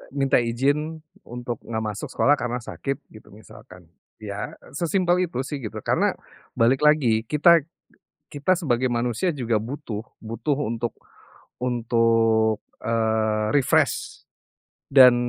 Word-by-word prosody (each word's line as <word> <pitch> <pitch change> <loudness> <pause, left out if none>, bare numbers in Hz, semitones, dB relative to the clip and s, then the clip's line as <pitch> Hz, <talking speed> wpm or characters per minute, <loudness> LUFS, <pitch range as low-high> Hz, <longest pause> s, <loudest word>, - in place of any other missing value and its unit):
Minta 135 -2 +3
izin, 145 +7 -1 0.2
untuk 120 -1 -5
nggak 110 -1 -4
masuk 105 -2 -4
sekolah 145 - +3
karena 125 0 -2
sakit, 135 +3 -5
gitu 110 - -15
misalkan. 90 -4 -15 0.3
Ya, 105 -1 -6 0.2
sesimpel 175 +3 +1
itu 130 -5 -3
sih 140 +1 -5
gitu, 110 -3 -7
karena, - - +1 0.4
balik 120 +3 +3
lagi, 125 -8 +4
kita 165 +3 +5 0.7
kita 165 +6 +1
sebagai 130 -7 0
manusia 120 - 0
juga 120 -7 -1
butuh, 120 -3 -5 0.2
butuh 115 +6 -2
untuk 115 -2 -2 0.7
untuk, 115 -2 +2 0.2
eee, 110 -1 +1
refresh. 140 - +1 0.7
Dan 130 -3 +8
120 Hz, 120 wpm, -24 LUFS, 110-145 Hz, 0.7 s, Dan